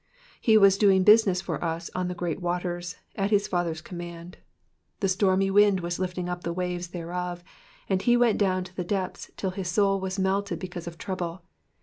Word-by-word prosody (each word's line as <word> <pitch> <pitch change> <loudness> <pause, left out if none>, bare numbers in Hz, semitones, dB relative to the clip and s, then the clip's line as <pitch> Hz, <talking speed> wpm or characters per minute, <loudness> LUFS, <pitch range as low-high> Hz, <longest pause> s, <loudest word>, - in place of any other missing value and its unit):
He 220 -2 +5
was 195 -1 +6
doing 195 -3 +5
business 210 -3 +5
for 165 -5 -4
us 165 0 -3
on 180 0 -1
the 180 - -4
great 175 0 -3
waters, 175 0 -3 0.2
at 195 0 0
his 205 -1 +2
Father's 170 -3 -1
command; 175 0 -8 0.6
the 195 - +1
stormy 195 0 +2
wind 205 -1 +5
was 175 0 -3
lifting 180 -1 -3
up 180 0 -4
the 170 - -2
waves 180 0 -3
thereof, 175 0 -5 0.4
and 190 -1 +1
he 240 +4 +4
went 240 -2 +3
down 185 -2 +1
to 180 0 -13
the 180 - -2
depths 185 +1 -3
till 190 - -2
his 185 -1 -5
soul 195 +1 +2
was 190 0 -4
melted 195 +1 0
because 175 -2 -7
of 170 -1 -7
trouble. 180 -1 -4
185 Hz, 195 wpm, -26 LUFS, 175-195 Hz, 0.6 s, was